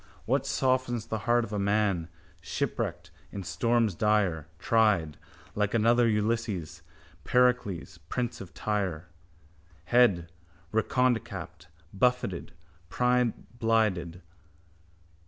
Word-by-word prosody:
What - - 0
softens 130 -3 0
the 110 -1 -3
heart 120 0 +4
of 110 - -7
a 105 - -1
man, 100 -4 +1 0.3
shipwrecked - - -3 0.2
in 100 - -5
storms 115 0 +1
dire, 100 -6 +1
Tried, 105 -10 +2 0.4
like 105 +1 0
another 115 +2 +4
Ulysses, 105 -5 -1 0.4
Pericles, 125 -8 +1
prince 125 -1 -2
of 90 -3 -9
Tyre? 90 -4 -2 0.8
Head, 90 -6 +3 0.4
redconecapped, 110 -7 -1 0.3
buffeted, 120 -4 0 0.4
brineblinded. 115 -7 0
105 Hz, 90 wpm, -28 LUFS, 95-120 Hz, 0.8 s, heart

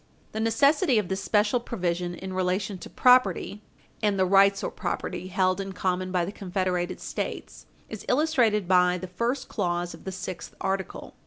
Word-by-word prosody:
441 - - -35
The 225 - +2
necessity 280 +4 +3
of 210 -4 0
this 190 0 -2
special 210 +5 +2
provision 175 -6 -2
in 190 +1 -7
relation 185 +2 -1
to - - -9
property 250 -4 +3 0.4
and 205 -2 +1
the 190 - +3
rights 195 +1 +4
or - - -2
property 185 - -4
held 185 0 +1
in 195 0 -6
common 185 0 -1
by 180 -2 +1
the 190 - -5
confederated 185 -2 -2
States - - -5 0.2
is - - -8
illustrated 250 - +2
by 180 -1 +4
the 185 - -6
first 235 +9 -2
clause 175 -3 -2
of - - -13
the 190 - -3
sixth 185 -1 -7
article. 190 0 -3
190 Hz, 175 wpm, -26 LUFS, 180-210 Hz, 0.4 s, rights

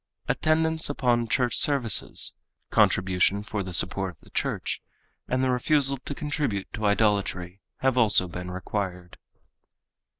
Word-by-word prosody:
Attendance 160 0 +1
upon 120 -4 +1
church 125 0 +1
services, 130 -8 +2 0.4
contribution 95 +2 +2
for 105 0 -4
the 95 -1 -6
support 90 +1 0
of - - -43
the - - -20
church, - - -2 0.5
and 130 +1 0
the 130 - +2
refusal 135 +2 +2
to 145 - -5
contribute 145 -10 -2
to 105 -1 -1
idolatry 100 -3 0 0.2
have 130 -1 +2
also 105 -5 +4
been 90 +1 -7
required. 90 -1 -5
110 Hz, 130 wpm, -26 LUFS, 95-130 Hz, 0.5 s, also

